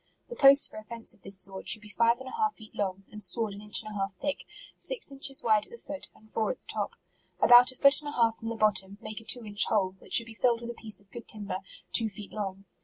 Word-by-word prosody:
The 485 - -7
posts 275 -5 +7
for - - -12
a - - -12
fence 230 +1 -3
of - - -24
this 195 +1 -2
sort, 195 0 -3
should 215 - +2
be 210 - -12
five 230 +1 +4
and 260 +1 -10
a - - -7
half 435 -2 0
feet 220 -2 -15
long, 195 -1 -3
and 210 - -9
sawed 220 -2 +1
an 200 - -10
inch 210 +1 0
and 215 - -8
a - - -8
half 195 0 -2
thick, 280 +9 -4 0.3
six - - -2
inches 270 -1 -5
wide 215 -3 +3
at - - -23
the 470 - -10
foot, 290 -9 -7
and 215 - -21
four 220 -2 0
at - - -3
the - - -43
top. - - -2 0.5
About 245 +1 +8
a - - -14
foot 280 +2 +7
and 295 - -6
a - - -7
half 230 -1 +2
from 225 - -5
the 230 - -3
bottom, 200 -2 +1
make 215 -1 -7
a - - -16
two 235 +1 +2
inch 205 -1 +1
hole, 195 -4 +1
which - - -1
should 230 - +6
be 230 - -11
filled 235 0 +1
with 235 0 -5
a - - -8
piece 220 -2 -3
of 200 - -29
good 235 - -9
timber, 205 -3 -4 0.3
two 225 -2 +2
feet 205 0 -10
long. 195 -2 -5
225 Hz, 290 wpm, -29 LUFS, 205-245 Hz, 0.5 s, About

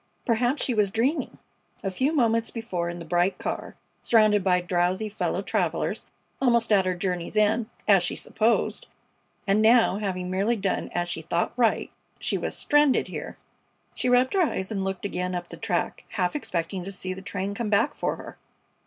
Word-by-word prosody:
Perhaps 245 +4 +1
she 250 - 0
was 210 -3 +2
dreaming! 240 - -1 0.5
A 195 - -1
few 260 +10 +1
moments 230 -6 +2
before 185 -7 -3
in 175 - -5
the 170 - -8
bright 175 +3 +1
car, - - -4 0.3
surrounded 215 -3 +4
by 180 -1 +3
drowsy 180 +4 0
fellow 210 - -2
travelers, - - -1 0.3
almost 235 -3 +3
at 195 -3 +4
her 185 - 0
journey's 180 +1 -3
end, 215 +2 +2 0.2
as 195 -3 +6
she 175 - -2
supposed; 225 +2 0 0.6
and 200 +2 +3
now, 225 -3 +5
having 185 -3 -3
merely 200 +6 +1
done 195 -3 -2
as 175 0 0
she 165 - -4
thought 170 +2 -1
right, 235 -2 +1 0.3
she - - -1
was - - -2
stranded 295 -2 +3
here! - - -6 0.6
She 250 - -1
rubbed 250 +1 +4
her 385 - +3
eyes 190 - -1
and 195 -3 -1
looked 190 0 -3
again 180 -2 -2
up 175 -1 -5
the - - -8
track, 200 -6 -2
half 180 +3 0
expecting 185 - -3
to 195 - -5
see 185 -1 -2
the 190 - -9
train 195 +1 -3
come 215 +1 -3
back 220 +7 +2
for - - -2
her. - - -11
200 Hz, 185 wpm, -26 LUFS, 180-230 Hz, 0.6 s, as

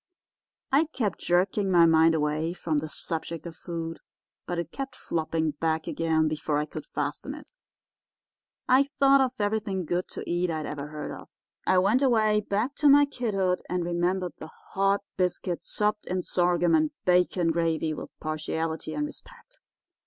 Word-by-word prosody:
I 285 +4 +4
kept 235 - -2
jerking 190 +3 +1
my 175 -2 +6
mind 160 0 +5
away 155 +2 0
from 160 -4 -1
the 155 +1 -5
subject 165 +1 -4
of 170 -1 -7
food, 165 -1 -5 0.5
but 175 - -2
it 170 -1 -3
kept 270 0 -5
flopping 160 -1 -1
back 160 +1 -1
again 160 -1 +1
before 155 -1 -1
I 150 - 0
could 155 0 -8
fasten 150 - -3
it. 300 - -13 1.2
I 270 +2 +5
thought 275 0 +6
of 260 -1 +1
everything 205 -3 -1
good 175 +3 -1
to - - -7
eat 175 +1 0
I 160 - -1
had 155 - -4
ever 145 -1 -5
heard 150 0 -6
of. - - -10 0.4
I 185 - +4
went 200 +8 +3
away 220 -5 +3
back 210 +6 -1
to 295 - +5
my 290 +1 +7
kidhood 195 -9 -1
and 180 -1 -1
remembered 175 +1 0
the 155 - -8 0.2
hot 195 +1 +2 0.2
biscuit 180 -1 -1
sopped 210 0 -1
in 185 0 -1
sorghum 175 -1 +2
and 155 -1 +4 0.2
bacon 180 -1 +3
gravy 165 -1 0
with - - -7
partiality 160 +1 -3
and 295 - 0
respect. 485 +10 -13
175 Hz, 165 wpm, -27 LUFS, 160-210 Hz, 1.2 s, my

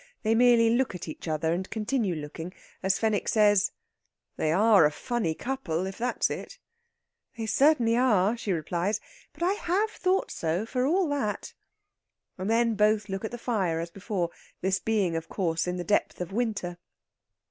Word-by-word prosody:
They 220 0 +2
merely 235 -1 +5
look 240 -4 +1
at 175 - -7
each 155 - -8
other, 160 +1 0
and 185 +2 -3
continue 215 -3 -1
looking 160 +4 -7 0.3
as 190 0 +2
Fenwick 220 -2 0
says: 205 -2 +4 0.6
"They 155 - 0
are 205 +1 +5
a 150 - +4
funny 175 -1 -2
couple, 195 -10 -2
if 190 +2 -6
that's 245 +2 0
it!" - - -6 0.8
"They 225 - -3
certainly 235 +1 +3
are," 220 -4 +3
she 225 -4 -3
replies. 180 +4 -1 0.3
"But - - -6
I 360 - +3
have 410 +2 0
thought 375 -1 0
so, 170 +6 -1
for 250 +2 0
all 360 +3 +2
that!" 270 -8 -2 0.8
And 190 +2 -4
then 230 0 +3
both 210 0 +2
look 195 +1 -4
at 220 - -2
the 240 - -6
fire 195 -9 -1
as 170 +1 -5
before, 190 -3 -3 0.3
this 190 +1 +1
being, 200 -6 0
of 165 0 -4
course, 165 -3 -1
in 180 0 -2
the 175 - -3
depth 205 - 0
of 180 0 -4
winter. 210 -7 -2
210 Hz, 175 wpm, -27 LUFS, 180-235 Hz, 0.8 s, merely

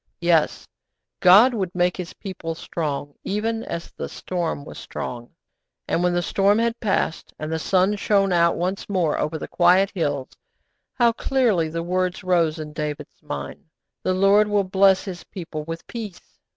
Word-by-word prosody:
Yes, 170 -3 +2 0.5
God 210 +8 +7
would 190 -6 -3
make 180 0 +2
His 180 -2 -6
people 170 -5 -6
strong, 145 -4 -4
even 225 +3 -1
as 170 - -6
the - - -6
storm 170 -5 -3
was - - -9
strong. 120 -1 -6 0.6
And 170 - 0
when 180 0 +2
the 175 - +1
storm 200 +4 +3
had 230 +1 0
passed, 190 -6 -1
and 155 +1 -5
the 160 - -1
sun 190 +4 +2
shone 195 -2 +2
out 170 -1 +4
once 185 +4 -2
more 180 -6 +1
over 155 +1 -1
the - - -6
quiet 185 +3 +4
hills, 145 -8 -2 0.6
how 240 -2 +4
clearly 230 -9 +1
the 165 +1 -3
words 180 +1 -1
rose 170 -3 +2
in 155 -1 -7
David's 150 -1 -5
mind, 70 -1 -6 0.4
'_The 185 0 0
Lord 200 +2 +5
will 205 -1 +2
bless 190 0 +4
His 185 -3 -6
people 160 -4 -7
with 165 +1 -6
peace! 215 -6 -9
180 Hz, 165 wpm, -23 LUFS, 165-195 Hz, 0.6 s, God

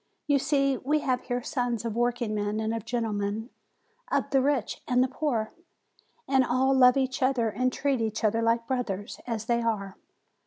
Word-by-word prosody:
You 285 -2 +3
see, 275 -1 +1
we 295 +4 0
have 255 -2 0
here 245 -1 -2
sons 245 -3 -2
of 225 -2 -3
workingmen 220 -3 -1
and 220 0 -1
of 225 -1 -4
gentlemen, 220 -1 -2 0.6
of - - 0
the 270 -1 +4
rich 270 -4 0
and 250 0 +3
the - - +1
poor, 255 -5 -2 0.7
and 265 -1 +4
all 255 +2 +2
love 250 -1 +6
each 260 -1 -1
other 255 -3 +2
and 255 +4 0
treat 275 -2 0
each 220 0 -2
other 225 +1 +2
like 230 0 +1
brothers, 230 -5 -3
as 225 -3 -3
they 235 0 +1
are. 205 -4 -2
240 Hz, 180 wpm, -27 LUFS, 220-260 Hz, 0.7 s, love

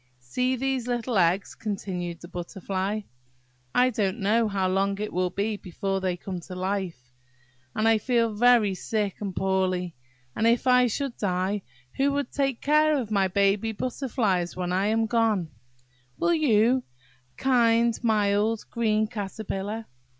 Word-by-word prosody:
"See 250 - -1
these 260 -1 -1
little 240 0 -1
eggs," 180 +3 +2
continued 185 -5 -4
the 175 - -9
Butterfly; 190 +3 -3 0.7
"I 250 +1 +5
don't 210 -3 -1
know 220 +3 +2
how 195 -2 0
long 195 +1 0
it 210 0 -4
will 180 0 +1
be 205 +4 -2
before 195 +1 -3
they 185 -1 -1
come 185 0 -5
to 180 +2 -9
life, 180 -9 -3 0.6
and 215 +1 +2
I 225 -1 +4
feel 230 -1 +1
very 225 -2 +4
sick 205 +1 -2
and 195 -3 -4
poorly, 185 -2 0 0.4
and 225 - +2
if 235 +2 +2
I 250 -1 +5
should 265 +2 -3
die, 190 +1 -1 0.4
who 275 +1 +3
will 285 0 0
take 275 -4 -2
care 305 +1 +3
of 235 -5 -4
my 195 -2 +3
baby 200 +3 +1
butterflies 220 -7 -1
when 180 -1 -3
I 190 +2 +1
am 225 +1 +2
gone? 220 -8 +1 0.7
Will 345 - +2
you, 255 -5 +3 0.6
kind, 235 -3 +3
mild, 210 0 +1
green 220 -2 +1
Caterpillar? 210 0 -5
210 Hz, 150 wpm, -26 LUFS, 190-235 Hz, 0.7 s, I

